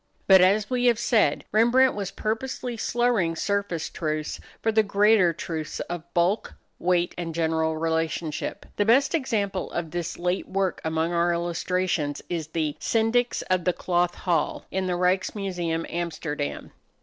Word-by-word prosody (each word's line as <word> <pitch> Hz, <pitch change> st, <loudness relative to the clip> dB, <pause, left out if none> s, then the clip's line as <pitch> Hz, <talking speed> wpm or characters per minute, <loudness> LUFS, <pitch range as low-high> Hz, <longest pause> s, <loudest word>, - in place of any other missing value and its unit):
But, 190 Hz, -1 st, +7 dB
as 200 Hz, +3 st, +4 dB
we 250 Hz, -1 st, 0 dB
have 240 Hz, -2 st, +4 dB
said, 230 Hz, -1 st, +2 dB
Rembrandt 240 Hz, +5 st, +4 dB
was 200 Hz, -2 st, -3 dB
purposely 235 Hz, +4 st, -3 dB
slurring 230 Hz, -7 st, +1 dB
surface 200 Hz, -3 st, -1 dB
truths 155 Hz, -2 st, -3 dB, 0.2 s
for 225 Hz, -, +1 dB
the 220 Hz, 0 st, +4 dB
greater 205 Hz, -2 st, +4 dB
truths 160 Hz, -1 st, -5 dB
of 175 Hz, 0 st, -6 dB
bulk, 180 Hz, +5 st, +1 dB, 0.2 s
weight, 175 Hz, -1 st, +1 dB
and 165 Hz, -2 st, -4 dB
general 160 Hz, -1 st, 0 dB
relationship. 160 Hz, -1 st, -2 dB
The 205 Hz, -, +2 dB
best 260 Hz, +8 st, +4 dB
example 210 Hz, -, -1 dB
of 165 Hz, -2 st, -4 dB
this 175 Hz, -1 st, -4 dB
late 180 Hz, +2 st, -1 dB
work 190 Hz, -1 st, -1 dB
among 160 Hz, +1 st, 0 dB
our 170 Hz, 0 st, +2 dB
illustrations 170 Hz, -3 st, -1 dB
is 165 Hz, -3 st, -3 dB
the 155 Hz, -2 st, -2 dB
"Syndics 235 Hz, +2 st, +1 dB
of 185 Hz, -1 st, 0 dB
the 180 Hz, -, +2 dB
Cloth 175 Hz, 0 st, 0 dB
Hall," 170 Hz, -4 st, -1 dB
in 190 Hz, 0 st, -1 dB
the 180 Hz, -, 0 dB
Ryks 180 Hz, +2 st, +1 dB
Museum, 175 Hz, -5 st, -2 dB
Amsterdam. 160 Hz, -4 st, -4 dB
180 Hz, 150 wpm, -25 LUFS, 165-210 Hz, 0.2 s, But